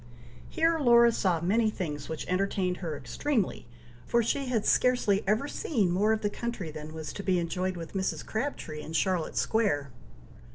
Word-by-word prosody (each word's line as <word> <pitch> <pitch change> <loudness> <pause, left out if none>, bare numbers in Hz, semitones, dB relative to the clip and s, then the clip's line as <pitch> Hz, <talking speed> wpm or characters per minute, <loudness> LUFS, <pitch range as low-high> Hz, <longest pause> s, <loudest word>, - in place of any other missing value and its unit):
Here 325 0 +2
Laura 235 -3 +6
saw 180 -7 +1
many 215 +6 +2
things 150 -8 -5
which 160 -1 -4
entertained 185 -1 0
her 160 -5 -4
extremely, 255 - -2 0.4
for 235 0 +3
she 275 +4 -1
had 230 -4 0
scarcely 220 -5 +3
ever 215 +7 +2
seen 220 - 0
more 205 +5 +2
of 220 0 +1
the 205 - +2
country 235 -9 -4
than 155 0 -8
was 160 -1 -6
to - - -5
be 190 -2 +1
enjoyed 180 +2 -2
with 165 -1 -8
Mrs. 190 -1 -2
Crabtree 220 - -4
in 160 - -8
Charlotte 180 -1 0
Square. 170 - +1
195 Hz, 170 wpm, -29 LUFS, 170-235 Hz, 0.4 s, Laura